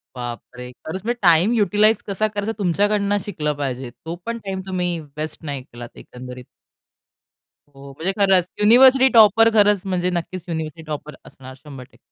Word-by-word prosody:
बापरे! 125 Hz, +1 st, -8 dB
खरंच 180 Hz, +4 st, -5 dB
म्हणजे 240 Hz, +1 st, -3 dB
टाईम 175 Hz, +4 st, +4 dB
युटिलाइज 215 Hz, +1 st, +2 dB
कसा 205 Hz, +2 st, 0 dB
करायचा, 210 Hz, +1 st, -4 dB
तुमच्याकडून 205 Hz, +2 st, +1 dB
शिकलं 150 Hz, -7 st, -3 dB
पाहिजे. 130 Hz, -3 st, -4 dB, 0.2 s
तो 165 Hz, -, -5 dB
पण 230 Hz, 0 st, -3 dB
टाईम 190 Hz, -1 st, -4 dB
तुम्ही 180 Hz, -2 st, -2 dB, 0.2 s
वेस्ट 155 Hz, +1 st, -5 dB
नाही 140 Hz, -3 st, -4 dB
केलात, 120 Hz, -1 st, -11 dB
एकंदरीत. 125 Hz, 0 st, -11 dB, 1.3 s
हो, 140 Hz, 0 st, -12 dB
म्हणजे 180 Hz, +4 st, -1 dB
खरंच, 190 Hz, -3 st, +4 dB, 0.2 s
युनिव्हर्सिटी 260 Hz, +4 st, +6 dB
टॉपर 225 Hz, 0 st, +6 dB
खरंच 205 Hz, -2 st, +4 dB
म्हणजे, 180 Hz, -1 st, -1 dB
नक्कीच 175 Hz, 0 st, -5 dB
युनिव्हर्सिटी 160 Hz, 0 st, -5 dB
टॉपर 150 Hz, 0 st, -6 dB
असणार 130 Hz, 0 st, -13 dB
100% 135 Hz, -3 st, -12 dB
180 Hz, 150 wpm, -21 LUFS, 145-205 Hz, 1.3 s, युनिव्हर्सिटी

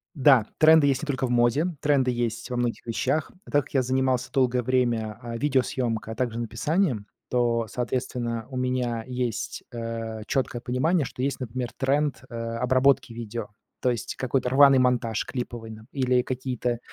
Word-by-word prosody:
Да, 130 Hz, -5 st, +5 dB
тренды 155 Hz, -2 st, +7 dB
есть 135 Hz, +1 st, +1 dB
не -, -, -1 dB
только 135 Hz, -2 st, 0 dB
в -, -, -7 dB
моде, 120 Hz, +6 st, +3 dB, 0.2 s
тренды 135 Hz, -3 st, +3 dB
есть 120 Hz, 0 st, -2 dB
во 125 Hz, -, -2 dB
многих 120 Hz, -1 st, -2 dB
вещах. 140 Hz, +6 st, -1 dB, 0.2 s
Так 145 Hz, -2 st, +3 dB
как -, -, -17 dB
я 135 Hz, -, +4 dB
занимался 130 Hz, 0 st, 0 dB
долгое 125 Hz, -3 st, +2 dB
время, 115 Hz, -3 st, 0 dB
э, 115 Hz, -1 st, -5 dB
видеосъемкой, 120 Hz, -5 st, 0 dB
а -, -, -10 dB
также 120 Hz, -2 st, -1 dB
написанием, 145 Hz, -, 0 dB, 0.2 s
то, 120 Hz, -2 st, +1 dB
соответственно, 120 Hz, -2 st, -3 dB
у 130 Hz, -, -5 dB
меня 125 Hz, -3 st, -1 dB
есть 125 Hz, -2 st, -3 dB
э 115 Hz, -1 st, -4 dB
чёткое 125 Hz, -3 st, -1 dB
понимание, 140 Hz, +5 st, +1 dB
что 125 Hz, -, -7 dB
есть, 135 Hz, 0 st, -1 dB
например, 125 Hz, 0 st, -4 dB
тренд, 140 Hz, 0 st, 0 dB
э, -, -, -12 dB
обработки 125 Hz, +3 st, +2 dB
видео, 115 Hz, -1 st, -5 dB, 0.3 s
то 125 Hz, -, +2 dB
есть 115 Hz, -4 st, -4 dB
какой-то 130 Hz, 0 st, 0 dB
рваный 135 Hz, 0 st, +7 dB
монтаж 120 Hz, -3 st, +1 dB
клиповый 120 Hz, -3 st, -5 dB
нап 110 Hz, 0 st, -11 dB
или 125 Hz, -2 st, +2 dB
какие-то 125 Hz, -2 st, -2 dB
125 Hz, 165 wpm, -26 LUFS, 115-130 Hz, 0.3 s, тренды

